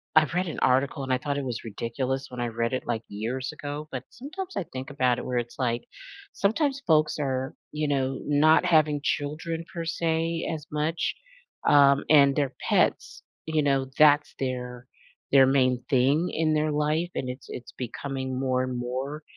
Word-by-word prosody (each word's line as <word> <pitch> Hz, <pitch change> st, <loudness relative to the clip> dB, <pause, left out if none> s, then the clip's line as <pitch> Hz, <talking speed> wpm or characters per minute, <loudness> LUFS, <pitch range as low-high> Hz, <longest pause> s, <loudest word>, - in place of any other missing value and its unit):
I've 155 Hz, +1 st, +4 dB
read 180 Hz, +1 st, +1 dB
an 160 Hz, -, -4 dB
article 135 Hz, +2 st, +2 dB
and 130 Hz, -, -3 dB
I 130 Hz, -, +3 dB
thought 140 Hz, +2 st, -3 dB
it -, -, -3 dB
was 120 Hz, -4 st, -4 dB
ridiculous 125 Hz, +5 st, -3 dB
when 125 Hz, -, -8 dB
I 120 Hz, -, 0 dB
read 115 Hz, 0 st, -1 dB
it, 130 Hz, -, -2 dB
like, 115 Hz, -2 st, -1 dB
years 120 Hz, +6 st, -4 dB
ago, 145 Hz, +1 st, -6 dB
but 130 Hz, -1 st, -4 dB
sometimes 365 Hz, +9 st, -7 dB
I -, -, 0 dB
think 130 Hz, 0 st, -7 dB
about 130 Hz, -3 st, +2 dB
it -, -, -5 dB
where 125 Hz, -1 st, 0 dB
it's 120 Hz, 0 st, -6 dB
like, 120 Hz, -3 st, -1 dB, 0.5 s
sometimes 275 Hz, +7 st, 0 dB
folks 155 Hz, -2 st, +3 dB
are, 130 Hz, -2 st, -2 dB, 0.2 s
you 150 Hz, 0 st, -1 dB
know, 135 Hz, -2 st, 0 dB
not 155 Hz, +3 st, +5 dB
having 155 Hz, -4 st, +3 dB
children 160 Hz, +3 st, -2 dB
per 170 Hz, -1 st, -4 dB
se 165 Hz, 0 st, -1 dB
as 155 Hz, -2 st, -7 dB
much, 155 Hz, +2 st, -1 dB, 0.5 s
um, 140 Hz, -1 st, +6 dB
and 140 Hz, -2 st, +6 dB
their 140 Hz, -2 st, 0 dB, 0.2 s
pets, -, -, +1 dB, 0.2 s
you 160 Hz, -1 st, +1 dB
know, 135 Hz, -2 st, +2 dB
that's 150 Hz, -1 st, +5 dB
their 125 Hz, -2 st, -4 dB, 0.4 s
their 135 Hz, -1 st, +7 dB
main 130 Hz, -2 st, +2 dB
thing 140 Hz, +6 st, +3 dB
in 160 Hz, -1 st, +1 dB
their 155 Hz, 0 st, +1 dB
life 150 Hz, +3 st, 0 dB
and 130 Hz, -, -2 dB
it's 125 Hz, +1 st, -8 dB
it's 125 Hz, -, -8 dB
becoming 130 Hz, +1 st, -4 dB
more 130 Hz, -1 st, +1 dB
and 130 Hz, -1 st, -3 dB
more, 130 Hz, +5 st, -4 dB
140 Hz, 185 wpm, -26 LUFS, 130-155 Hz, 0.5 s, their